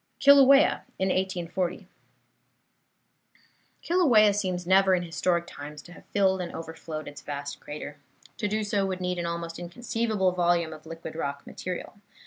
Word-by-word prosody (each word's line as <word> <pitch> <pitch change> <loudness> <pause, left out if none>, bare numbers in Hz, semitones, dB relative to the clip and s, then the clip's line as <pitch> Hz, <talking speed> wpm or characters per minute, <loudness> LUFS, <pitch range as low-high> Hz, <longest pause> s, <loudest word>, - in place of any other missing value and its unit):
KILAUEA 275 0 +6 0.2
IN 190 - 0
1840 185 -1 -2 2.0
Kilauea 245 - +5
seems 185 -3 -2
never, 190 +1 +5
in 175 - -1
historic 170 0 0
times, 145 -2 -9
to 170 - -14
have 180 - -14
filled 190 -2 +2
and 175 - -5
overflowed 160 -1 -7
its 145 - -9
vast 145 0 -6
crater. 150 0 -8 0.4
To 210 - -1
do 215 +1 -1
so 205 -1 0
would 185 -1 -3
need 180 -1 -2
an 170 - -2
almost 170 0 -4
inconceivable 215 +1 -1
volume 175 -2 +1
of 155 +1 -13
liquid 165 -1 -8
rock 140 -3 -4
material. 185 +3 -6
180 Hz, 145 wpm, -27 LUFS, 165-200 Hz, 2.0 s, KILAUEA